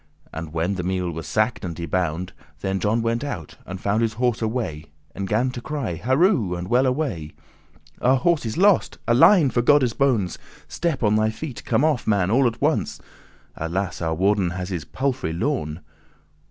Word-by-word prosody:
And 80 0 -6
when 85 +4 -1
the 95 - -3
meal 90 -1 -1
was 80 0 -6
sacked 110 +2 0
and 85 -4 -5
y 85 - -4
bound, 90 0 -2 0.3
Then 95 0 -1
John 110 +3 +1
went 115 +2 0
out, 90 - -6
and 95 0 -6
found 100 +3 0
his 115 -1 +1
horse 120 0 0
away, 110 -10 -2 0.3
And 100 0 -4
gan 115 +6 +1
to 120 - -7
cry, 140 - -3
"Harow, 130 - +2
and 90 +2 -5
well 130 +2 +3
away! 125 - -2 0.7
Our 130 +2 +4
horse 165 +4 +2
is 110 +3 -4
lost: 195 0 +3
Alein, 135 - +6
for 120 - +2
Godde's 130 -2 +4
bones, 115 - +1 0.3
Step 160 -7 -2
on 105 0 +3
thy 110 0 +2
feet; 130 +4 -7
come 145 - +2
off, 150 -6 0
man, 100 -3 +2
all 130 +2 +4
at 115 - -3
once: - - 0 0.6
Alas! 90 +4 -3
our 80 -1 0
warden 95 +1 +2
has 90 +1 -5
his 85 -6 -4
palfrey 130 -11 -2
lorn. 85 - -2
110 Hz, 185 wpm, -23 LUFS, 90-130 Hz, 0.7 s, Alein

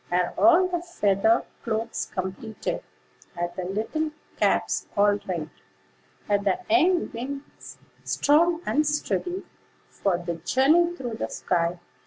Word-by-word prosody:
Are 180 0 +1
all 345 +2 +6
the 350 -2 -2
feather 220 - +2 0.2
cloaks 225 0 -2
completed? 190 +4 -4 0.6
Are 175 0 -1
the 185 - -4
little 225 - -2 0.3
caps - - +1
all 205 0 +4
right? 170 -5 -2 0.8
Are 205 -1 +3
the 200 -1 +1
young 350 +1 +3
wings 275 +4 -7 0.3
strong 330 +3 +3
and 305 - +2
steady 355 +5 -1 0.5
For 195 -3 0
the 170 -1 -4
journey 300 - +3
through 240 -7 -5
the - - -3
sky? 170 -1 0
230 Hz, 125 wpm, -26 LUFS, -, 0.8 s, all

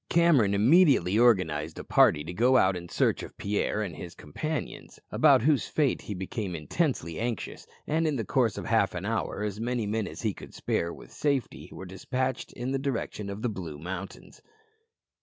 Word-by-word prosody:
Cameron 150 -13 +4
immediately 120 - +5
organized 80 -10 +2
a - - -6
party 75 - +4
to 85 +3 -6
go 125 +7 +4
out 95 -5 +3
in 85 -1 -7
search - - +1
of - - -10
Pierre 105 +1 -1
and 90 -6 -5
his 85 +2 -9
companions, 155 - -5
about - - +5
whose 145 -1 +2
fate 145 -4 +1
he 105 - -6
became 95 0 -4
intensely 85 - -2
anxious, 115 -3 -4 0.2
and 160 +1 +1
in 150 - 0
the 115 -5 -2
course 120 -4 +1
of - - -5
half - - +2
an - - -4
hour 105 - -2
as 105 0 -3
many 120 -1 -1
men 110 +1 -1
as - - -8
he 110 -3 0
could - - -12
spare 85 - -1
with - - -12
safety 140 -4 -2
were 95 - -8
despatched 125 +8 -3
in 125 +2 -4
the 135 - 0
direction 120 -6 -3
of 100 +2 -6
the 125 - +1
Blue 85 -8 -6
Mountains. 90 +4 -8
110 Hz, 190 wpm, -28 LUFS, 95-130 Hz, 0.2 s, immediately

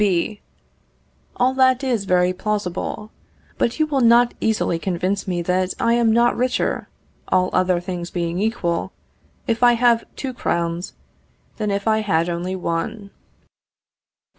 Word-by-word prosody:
B. 200 +2 0 0.9
All 255 +1 +2
that 260 0 +3
is 240 -6 0
very 180 -1 +2
plausible. 210 +1 -3 0.5
But 235 - 0
you 310 - +4
will 285 -3 0
not 235 0 +5
easily 215 -6 0
convince 185 +3 -2
me 175 -2 -1
that 185 +1 0
I 230 - +2
am 235 -1 +3
not 235 +2 +3
richer 255 +1 -1 0.4
(all 185 0 +2
other 185 -1 +2
things 175 -1 -5
being 170 0 -2
equal) 200 -6 -1 0.5
if 230 0 -1
I 245 -1 +6
have 235 -1 +3
two 265 -2 -4
crowns, 170 -6 -2 0.6
than 215 -2 -2
if 200 +1 -2
I 220 0 +3
had 170 -5 +1
only 175 +2 -3
one. 195 +4 -3
200 Hz, 140 wpm, -21 LUFS, 180-235 Hz, 0.9 s, I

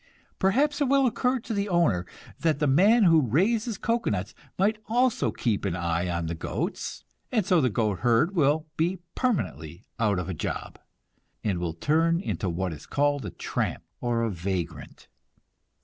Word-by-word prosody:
Perhaps 285 +10 +2
it - - +4
will 275 0 +4
occur 250 +2 +1
to 230 - -5
the 200 0 -1
owner 135 - +2 0.3
that 160 -3 +1
the 150 - 0
man 200 - +5
who 165 -4 +6
raises 205 - +1
cocoanuts 115 - -1 0.2
might 210 +3 +2
also 245 +2 +2
keep 110 -5 -1
an 95 -4 -1
eye 85 0 -1
on 85 -1 -2
the 80 - -3
goats, 80 - -4 0.3
and 220 -6 +1
so 180 -4 +4
the 130 - +3
goat 105 -4 0
herd 120 - +3
will 155 0 +2
be 175 +4 +1 0.2
permanently 90 - -2
out 105 -4 +2
of 90 - -3
a 95 - -3
job, 80 - -5 0.6
and 95 -5 0
will 85 -2 -3
turn 165 - +2
into 115 - -2
what 90 +1 -2
is 75 - -11
called 145 -4 0
a - - -3
tramp, - - -3 0.2
or 115 -1 0
vagrant. 90 -2 -5
145 Hz, 165 wpm, -27 LUFS, -, 0.6 s, who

